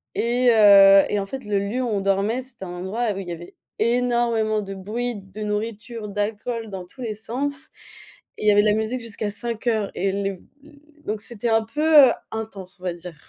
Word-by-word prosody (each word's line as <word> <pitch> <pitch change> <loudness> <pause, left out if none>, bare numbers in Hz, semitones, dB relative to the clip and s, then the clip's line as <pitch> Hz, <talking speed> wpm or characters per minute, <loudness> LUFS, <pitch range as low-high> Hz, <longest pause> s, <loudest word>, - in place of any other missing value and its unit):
et 245 +2 +2
heu, 200 -3 +8
et 205 - 0
en 195 - -2
fait 265 +4 -7
le 205 -1 0
lieu 205 +6 -2
où 245 - -1
on 205 -3 -1
dormait, 195 +5 +1
c'était 240 -6 -9
un - - -8
endroit 215 +4 -2
où 195 - -8
y 180 -3 -6
avait 170 +1 -11 0.3
énormément 235 -2 +1
de 195 -1 -6
bruit, 230 +6 -3
de 195 0 -11
nourriture, 215 +1 -4
d'alcool 220 +3 -3
dans 190 -2 -7
tous 220 +9 -24
les 225 -3 -3
sens 270 +6 -4 0.7
et - - -7
il - - +2
y - - +7
avait 205 - +5
de 210 - +1
la 210 - +4
musique 220 +4 -2
jusqu'à 220 -2 -4
5:00 225 -1 -2
et 195 +1 0
le 195 -1 -3 0.7
donc 210 0 -3
c'était 235 +1 -4
un 225 0 +3
peu, 295 +4 +6
heu, - - +2 0.2
intense, 205 -4 -7
on - - -19
va 180 -2 -1
dire. 175 0 -10
215 Hz, 210 wpm, -23 LUFS, 195-235 Hz, 0.7 s, heu